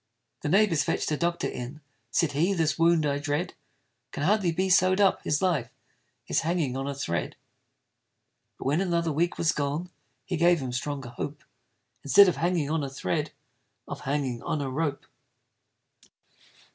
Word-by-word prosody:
The - - -2
neighbors 190 -4 +3
fetch'd - - -1
a - - +2
doctor 170 +2 -1
in: 125 +5 -6 0.3
Said 150 +5 +1
he, 170 +8 +1
this 160 -3 0
wound 165 -1 +4
I 145 -1 0
dread 145 +4 -2 0.6
Can 145 - -4
hardly 195 0 +2
be 185 +3 0
sew'd 185 +1 +4
up 195 -2 +3
his 150 +4 0
life 165 -10 +1 0.6
Is - - +1
hanging 160 -6 -1
on 135 +1 -3
a 140 - -3
thread. 85 -11 -3 1.2
But - - -9
when 145 +6 +2
another 170 -3 0
week 170 +4 0
was 165 - +2
gone, 150 +5 -3 0.3
He 180 -2 -2
gave 170 +1 +4
him 130 -2 -4
stronger 130 0 -4
hope 140 +4 -6 0.6
Instead 200 +8 +7
of 175 - +1
hanging 165 -2 0
on 160 -2 0
a 140 - -3
thread, 110 -9 -2 0.6
Of - - -6
hanging 135 -4 -2
on 155 - -2
a 135 -2 -3
rope. 145 0 -2
155 Hz, 165 wpm, -27 LUFS, 140-175 Hz, 1.2 s, Instead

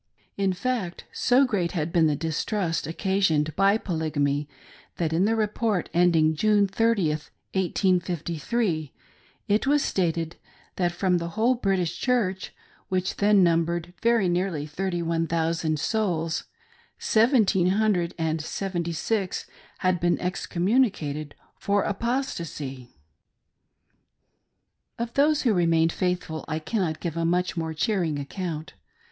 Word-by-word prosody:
In 195 -1 +1
fact, 195 -2 -3
so 255 +3 +3
great 185 -9 -1
had 165 -2 -2
been 165 -2 +4
the 150 - +1
distrust 165 +3 -2
occasioned 165 -4 +1
by 195 +2 +4
Pblygamy, 150 -6 -1 0.5
that 160 -2 -1
in 175 +4 +3
the 225 +2 +2
report 215 -3 0
end 175 0 +4
ing 155 0 +4
June 205 +5 +3
30th, 195 -7 0 0.2
1853, 175 - 0 0.5
it 210 +6 +1
was 290 0 +3
stated 165 -3 -1 0.4
that 175 -2 +1
from 180 0 +1
the 170 0 -4
whole 235 +4 +4
British 190 -8 -1
Church 210 -7 0 0.2
— - - -32
which 185 -1 -1
then 205 -1 +5
numbered 170 0 +1
very 230 -4 +3
nearly 175 -4 -1
thirty 175 +3 -3
one 165 0 0
thous 165 0 0
and 155 -1 0
souls 165 -5 -1 0.3
— - - -32
seventeen 220 -6 +3
hundred 190 -3 +1
and 160 -1 -1
seventy 170 0 -3
six 195 +3 -2 0.4
had 185 -1 +3
been 175 0 +1
ex 180 +1 -3
communicated 170 - 0 0.2
for 200 -1 +1
apostasy! 170 - -3 2.1
Of 235 0 -4
those 295 +1 +3
who 235 -5 +3
remained 165 -2 +3
faithful 180 -4 -2
I 155 - -2
cannot 160 -1 -2
give 170 -3 -3
a 165 - -1
mudh 180 +2 +1
more 160 -1 -3
cheering 165 -2 0
account. 155 +2 -5
175 Hz, 135 wpm, -26 LUFS, 160-205 Hz, 2.1 s, then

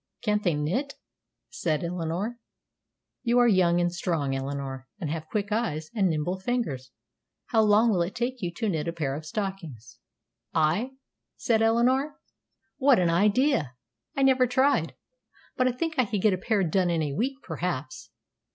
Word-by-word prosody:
Can't 210 -2 +1
they 175 -6 +1
knit?" 210 - -2 0.6
said 165 - -1
Eleanor. 180 +7 -3 0.8
"You 240 -1 +2
are 245 0 +6
young 180 -5 +4
and 175 0 +1
strong, 165 -6 -1
Eleanor, 135 -1 -4
and 155 -5 -3
have 160 -1 -4
quick 205 0 -2
eyes 160 -9 -1
and 200 -5 +2
nimble 165 +4 -1
fingers; 190 - -2 0.6
how 225 - +4
long 215 +2 +4
would 175 -4 +1
it 190 - -9
take 245 +1 -2
you 175 -2 -2
to 225 - -2
knit 160 -5 -1
a 170 - -2
pair 150 -5 -2
of 155 +1 -7
stockings?" 160 - -5 0.6
"I?" 175 +12 +1 0.4
said 225 -2 +1
Eleanor. 250 +6 +2 0.6
"What 270 -2 +5
an 175 -2 +2
idea! 205 - +2 0.4
I 275 - +3
never 260 -1 +4
tried, 260 +4 +2 0.6
but 255 -1 +2
I - - +3
think 320 +7 -2
I 255 - +4
could 205 -2 -3
get 215 -3 +5
a - - 0
pair 210 0 +1
done 180 +2 +1
in 165 -2 +1
a 145 -2 -2
week, 255 - -1
perhaps." 130 -9 -4
185 Hz, 170 wpm, -27 LUFS, 155-235 Hz, 0.8 s, are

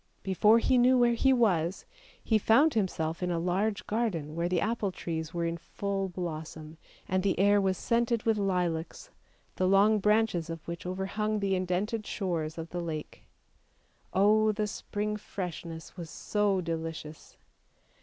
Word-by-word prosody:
Before 210 +4 +4
he 245 +2 +3
knew 255 +1 +5
where 240 -1 +4
he 265 +3 +3
was, 190 -8 +1 0.4
he 220 -2 +2
found 275 +9 +4
himself 170 -6 -1
in 180 - -1
a 175 - 0
large 195 +5 -1
garden 195 -10 -2
where 170 +2 -1
the 180 -1 +1
apple 215 0 -1
trees 160 -3 -4
were 170 0 -2
in 170 0 -2
full 195 +2 -3
blossom, 160 -2 -6 0.3
and 185 0 +1
the 195 0 0
air 205 +1 +5
was 190 -1 +1
scented 235 +1 0
with 225 -2 +1
lilacs, 180 - -2 0.5
the 185 - +2
long 205 +3 +5
branches 210 -5 +2
of 165 -1 -7
which 170 +1 -6
overhung 200 +3 -2
the 200 -1 0
indented 190 +4 -1
shores 165 -5 -2
of 165 0 -6
the 175 - -3
lake! 160 -3 -6 0.8
Oh! 215 +2 +4
the 215 0 -1
spring 210 +1 -3
freshness 170 -5 -7
was 170 -3 -7
so 205 -1 0
delicious 160 -2 -6
190 Hz, 155 wpm, -29 LUFS, 170-215 Hz, 0.8 s, knew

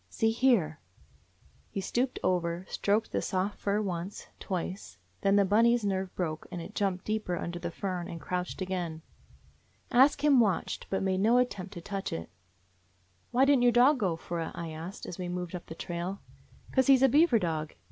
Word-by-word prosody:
See 225 0 +1
here 225 - +2 0.5
!" - - -33
He - - 0
stooped 245 +6 -1
over, 175 0 0
stroked 210 +2 0
the - - 0
soft 190 +2 -2
fur, 205 +1 0
once, 180 0 -5
twice 185 - -4
— 90 - -38
then 195 0 +3
Bunny's 230 +2 +4
nerve 190 -2 -1
broke, 160 -4 -3
and 175 - -4
it 165 - -8
jumped 190 -2 -1
deeper 215 -5 -1
under 175 0 -4
the 175 - -3
fern 180 0 -4
and 165 - -7
crouched 180 +2 -3
again. 175 -4 -4 0.9
Ask 270 +5 +5
Him 285 -4 +6
watched, 200 -7 0
but 195 - -1
made 190 -1 +1
no 225 +5 +4
at 250 0 +3
tempt 195 0 -7
to 170 - -6
touch 195 +2 -4
it. 80 0 -5 1.0
"Why 255 +3 +4
didn't 275 -2 +4
your 245 0 +5
dog 255 +4 +5
go 185 -6 +1
for 170 +1 -5
it?" 165 - -4
I 165 -1 -5
asked 165 +5 -7
as 180 - -7
we 180 -1 -3
moved 180 0 -4
on - - -2
up - - -27
the 160 - -8
trail. 175 +3 -4 0.3
" - - -23
'Cause 260 -2 +3
he 270 -1 +8
's 260 - 0
a - - +8
beaver 295 -1 +5
dog. 160 -5 -2
190 Hz, 205 wpm, -30 LUFS, 175-225 Hz, 1.0 s, he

